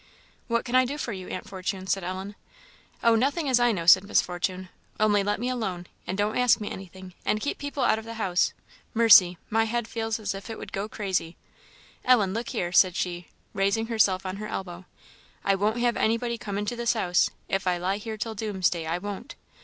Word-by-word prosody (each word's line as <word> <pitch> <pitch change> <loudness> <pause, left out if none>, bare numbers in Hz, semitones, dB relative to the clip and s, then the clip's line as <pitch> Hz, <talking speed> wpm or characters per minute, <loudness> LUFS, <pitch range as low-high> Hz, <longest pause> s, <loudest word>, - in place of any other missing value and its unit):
"What 235 -1 0
can 245 - -5
I 255 0 +6
do 275 +4 -3
for 240 -6 -3
you, 185 -2 -7
Aunt 185 - -6
Fortune?" 190 0 -4
said 195 0 0
Ellen. 190 +3 -5 0.7
"Oh, 230 - +6
nothing 280 +7 +1
as 255 -2 +4
I 240 0 +4
know," 170 -6 -3
said 190 +2 +8
Miss 200 - +3
Fortune 185 +1 -3 0.3
"only 210 -1 +4
let 205 +1 -1
me 245 - -2
alone, 195 -9 -3 0.2
and 190 - -3
don't 205 +1 0
ask 250 -1 +4
me 210 - -5
anything, 185 -1 -9
and 215 - +1
keep 285 - -3
people 285 -2 -3
out 220 - +3
of 220 - -10
the 230 0 -7
house. 185 -5 +1 0.4
Mercy! 200 -6 +7
my 225 +1 +3
head 235 0 -2
feels 225 0 -2
as 205 -2 -2
if 195 +3 -8
it 225 - -5
would - - -9
go 200 +2 -3
crazy! 190 -6 -2 0.7
Ellen, 215 -7 +4
look 230 +2 -3
here," 175 -9 -2
said 180 0 +5
she, 175 -1 -3 0.3
raising 200 +2 +1
herself 200 -5 +2
on 185 +1 -4
her 215 +1 -5
elbow 180 -2 -6 0.6
"I 195 - +4
won't 210 +4 +1
have 240 0 +1
anybody 235 +2 0
come 200 -2 -4
into 210 +4 -2
this 235 -1 +1
house 180 -6 +2 0.2
if 195 -1 -1
I 180 -1 +2
lie 185 +3 -1
here 220 +1 -6
till 225 +2 -3
doomsday, 190 -6 -1
I 165 +2 0
won't! 200 +1 -7
205 Hz, 215 wpm, -26 LUFS, 185-230 Hz, 0.7 s, said